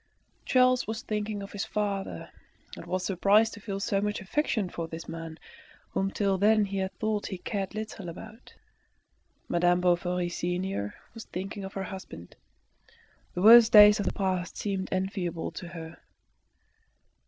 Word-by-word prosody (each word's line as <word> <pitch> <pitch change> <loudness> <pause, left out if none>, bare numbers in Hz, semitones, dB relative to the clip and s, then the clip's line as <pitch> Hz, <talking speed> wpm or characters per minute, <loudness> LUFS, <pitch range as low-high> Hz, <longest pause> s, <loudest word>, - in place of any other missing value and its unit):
Charles 255 0 +3
was 220 0 -4
thinking 210 -1 -3
of 200 - -9
his 205 - -3
father, 200 -2 -3 0.4
and - - -10
was 185 0 -2
surprised 205 +4 +3
to 205 - -9
feel 195 -1 -5
so 195 0 0
much 210 0 -1
affection 215 0 -1
for 170 -2 -5
this 165 0 -8
man, 165 -1 -7 0.5
whom 195 0 0
till 195 -1 0
then 215 +1 +4
he 195 0 -4
had 190 0 -2
thought 215 -1 -1
he 190 - -5
cared 195 +1 -4
little 215 -4 -6
about. 215 +7 -11 0.9
Madame 175 +1 +2
Bovary 180 0 +1
senior 175 - -3 0.2
was 225 -1 -9
thinking 195 +2 -6
of 190 - -7
her 195 - -3
husband. 185 - -9 1.0
The 180 - -2
worst 230 +1 +9
days 210 -1 +9
of 205 - -1
the - - 0
past 185 -2 -2
seemed 195 -2 -3
enviable 185 -3 -2
to 175 - -8
her. 165 -1 -9
195 Hz, 155 wpm, -28 LUFS, 180-210 Hz, 1.0 s, worst